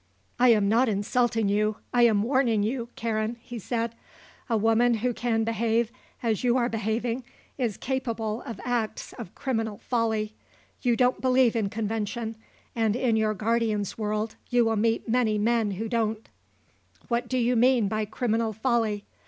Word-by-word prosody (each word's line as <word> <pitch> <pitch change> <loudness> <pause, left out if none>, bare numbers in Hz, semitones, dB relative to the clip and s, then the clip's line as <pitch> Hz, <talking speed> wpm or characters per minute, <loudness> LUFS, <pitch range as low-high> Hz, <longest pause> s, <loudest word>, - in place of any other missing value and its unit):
"I 250 - +6
am 210 -3 +4
not 230 +4 +3
insulting 225 +2 +1
you, 210 +1 +1 0.2
I 240 -1 +6
am 210 -3 +2
warning 240 -4 +2
you, 235 +2 -2
Karen," 225 0 -2
he 245 0 -8
said. 230 +2 -2 0.6
"A 230 - +2
woman 225 +2 +3
who 245 +3 -1
can 225 -2 0
behave 230 +1 +1 0.3
as 225 -2 0
you 245 0 +3
are 240 -1 +1
behaving 230 +3 -2 0.4
is 230 -6 -1
capable 230 -4 -2
of 230 -6 -7
acts 240 -3 -2
of 175 - -8
criminal 225 -5 -2
folly. 220 -3 -1 0.5
You 245 -2 +2
don't 250 +1 +2
believe 255 -2 +3
in 215 -3 0
convention, 220 +1 -3 0.4
and 225 -2 +1
in 245 -2 +1
your 215 -1 +1
guardian's 215 -1 0
world 215 0 -2
you 245 -1 +3
will 225 0 +1
meet 225 +2 +1
many 225 -2 +2
men 225 0 +2
who 220 +4 -3
don't." 220 -1 -1 0.8
"What 240 -1 0
do 255 - -1
you 245 0 +2
mean 240 -2 +4
by 215 +1 -1
criminal 225 0 -1
folly?" 220 -2 0
225 Hz, 160 wpm, -27 LUFS, 215-240 Hz, 0.8 s, I